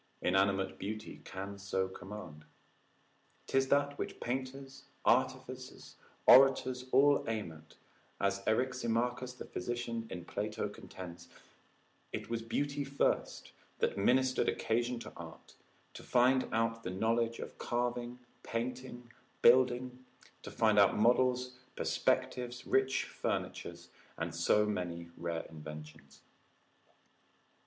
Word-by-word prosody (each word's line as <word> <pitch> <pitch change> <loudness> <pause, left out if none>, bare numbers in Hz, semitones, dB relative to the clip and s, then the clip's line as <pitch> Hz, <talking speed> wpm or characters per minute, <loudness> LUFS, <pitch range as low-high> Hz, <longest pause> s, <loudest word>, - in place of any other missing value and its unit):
Inanimate 95 +1 +2
beauty 110 +2 -6
can 100 +1 -6
so 95 -1 -1
command. 95 -6 -9 1.0
'Tis 135 0 +2
that 145 +1 +2
which - - -4
painters, 135 +2 -5 0.2
artificers, 130 0 0 0.3
orators, 130 -1 +6
all 140 +2 +5
aim 110 -6 -2
at, 80 0 -15 0.4
as 100 0 +1
Eriximachus 125 +1 0
the - - -7
physician, 120 -1 -4
in 90 -2 -6
Plato 105 +2 -3
contends, 90 -3 -10 0.8
It - - -5
was 115 -1 -1
beauty 140 +5 -1
first 140 0 -1 0.3
that - - 0
ministered 130 +6 +3
occasion 120 +2 0
to - - -9
art, - - -11 0.4
to - - -9
find 130 +1 +3
out 115 0 0
the 90 - -4
knowledge 115 +4 +1
of - - -8
carving, 120 0 -2 0.2
painting, 120 0 -5 0.3
building, 125 0 +4 0.4
to - - -8
find 110 -2 +3
out 100 - +5
models, 125 +2 +2 0.2
perspectives, 125 0 0
rich 135 0 +2
furnitures, - - -4 0.3
and 80 0 -3
so 85 +5 +3
many 85 -5 -3
rare 85 -1 -3
inventions. 75 -1 -11
120 Hz, 110 wpm, -33 LUFS, 100-130 Hz, 1.0 s, orators